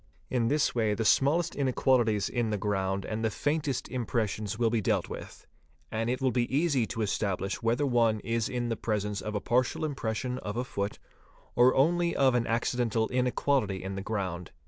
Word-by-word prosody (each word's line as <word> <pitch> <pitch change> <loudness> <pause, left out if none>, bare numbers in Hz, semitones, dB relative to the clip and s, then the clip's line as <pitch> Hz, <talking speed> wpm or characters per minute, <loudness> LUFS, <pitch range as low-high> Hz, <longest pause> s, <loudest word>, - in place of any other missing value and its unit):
In 120 -3 +1
this 145 +4 +2
way 110 -3 +1
the 115 - -2
smallest 160 +9 +3
inequalities 125 -6 +2
in 120 -2 -1
the 105 - 0
ground 95 -1 -1
and 110 +1 -3
the 110 - +2
faintest 145 +2 -1
impressions 110 -4 -2
will 115 -1 +2
be 115 -2 +1
dealt - - 0
with, - - -9 0.5
and 115 +1 -1
it 125 - 0
will 130 -1 +1
be 120 -1 0
easy 145 -8 +2
to 115 -2 -2
establish 100 -1 -1
whether 120 +5 +1
one 115 -4 +2
is 115 -1 -1
in 120 -1 -2
the 115 - 0
presence 105 -1 -2
of 105 0 -4
a - - +1
partial 125 +7 +1
impression 125 -3 -3
of 105 +2 -5
a 125 - 0
foot 100 -4 -3 0.6
or 125 +1 +5
only 170 +5 +2
of 135 -2 +4
an 120 -1 +1
acci 115 +2 0
dental 115 -2 +1
inequality 125 -5 0
in 95 +1 -4
the 95 - -4
ground. 95 -5 -3
115 Hz, 190 wpm, -29 LUFS, 105-130 Hz, 0.6 s, or